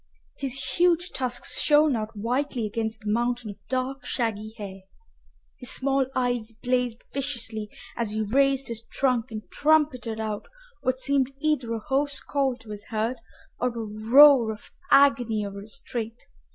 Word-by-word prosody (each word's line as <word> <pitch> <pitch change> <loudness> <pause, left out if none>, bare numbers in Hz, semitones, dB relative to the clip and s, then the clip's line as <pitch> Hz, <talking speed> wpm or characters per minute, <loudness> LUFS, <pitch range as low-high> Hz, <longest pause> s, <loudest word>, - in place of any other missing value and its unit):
His 270 -1 -1
huge 350 0 +3
tusks 250 -2 +1
shone 295 -2 +4
out 220 0 -4
whitely 245 +2 -1
against 220 +1 -3
the 210 -1 -2
mountain 240 0 -1
of 205 - -14
dark 260 0 -2
shaggy 220 -3 -2
hair. 195 -2 -8 0.8
His 250 - -3
small 270 -1 +2
eyes 245 -3 -1
blazed 245 0 -1
viciously 235 -6 -1 0.3
as 225 -3 -1
he 220 0 0
raised 275 +4 +2
his 230 -1 0
trunk 250 -1 0
and 215 -2 -7
trumpeted 285 -7 +2
out 215 -2 -4 0.3
what 255 0 0
seemed 275 0 +2
either 300 -6 0
a 225 - -2
hoarse 280 +1 0
call 270 -3 -1
to 220 -2 -11
his 205 -1 -6
herd 225 +3 -2 0.4
or 250 - +1
a 240 -1 -4 0.3
roar 275 -5 +8
of 215 - -11 0.2
agony 245 -7 +4
over 200 0 -7
his 210 +4 -8
strait. 230 -3 -5
245 Hz, 155 wpm, -26 LUFS, 220-275 Hz, 0.8 s, roar